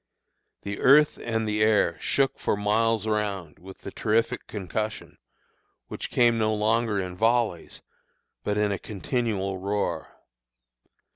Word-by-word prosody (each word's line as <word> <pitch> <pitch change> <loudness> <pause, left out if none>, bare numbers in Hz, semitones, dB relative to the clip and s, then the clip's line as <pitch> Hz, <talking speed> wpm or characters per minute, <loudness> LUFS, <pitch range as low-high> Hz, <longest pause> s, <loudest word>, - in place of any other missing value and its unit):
The 100 0 -5
earth 150 +3 +5
and 115 -1 -1
the 105 0 -1
air 110 -1 +3
shook 135 -1 0
for - - 0
miles 110 +1 +1
around 100 -7 -2
with 95 +1 -13
the 100 - -7
terrific 115 +4 0
concussion, 105 +2 -5 0.7
which - - -5
came 120 -1 +3
no 110 0 +1
longer 110 0 +1
in 90 -1 -4
volleys, 115 -4 0 0.6
but 105 0 -1
in 105 -1 +1
a 100 - -2
continual 100 -3 -2
roar. 95 -4 -2
105 Hz, 130 wpm, -26 LUFS, 100-115 Hz, 0.7 s, earth